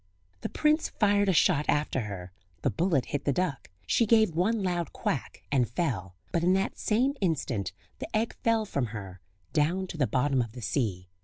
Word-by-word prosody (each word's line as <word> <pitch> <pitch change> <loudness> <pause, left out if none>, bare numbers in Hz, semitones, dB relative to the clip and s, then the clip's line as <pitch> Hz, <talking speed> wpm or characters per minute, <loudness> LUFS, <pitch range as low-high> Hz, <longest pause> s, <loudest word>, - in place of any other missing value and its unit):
The - - -4
prince 305 +1 +2
fired 205 -2 +2
a - - +5
shot 150 -3 +3
after 145 -2 +1
her; 95 -3 -7 0.3
the - - +2
bullet 165 -6 +1
hit 145 -1 -1
the 140 - +3
duck; 165 -3 -2 0.2
she 230 - +2
gave 220 -3 +5
one 205 +5 +1
loud 175 -2 -1
quack, 135 - -3
and 130 -4 +2
fell; 115 - -2 0.2
but 170 - 0
in 180 +2 +4
that 195 +1 0
same 250 +6 +2
instant 130 - 0 0.3
the - - -4
egg 225 +1 -1
fell 225 -1 +3
from 140 - -1
her 95 -3 -9 0.3
down 170 +6 +2
to 170 - -7
the 135 -4 +2
bottom 135 +3 +2
of 115 -2 -4
the 125 - -8
sea. 95 -4 -1
155 Hz, 190 wpm, -28 LUFS, 120-195 Hz, 0.3 s, a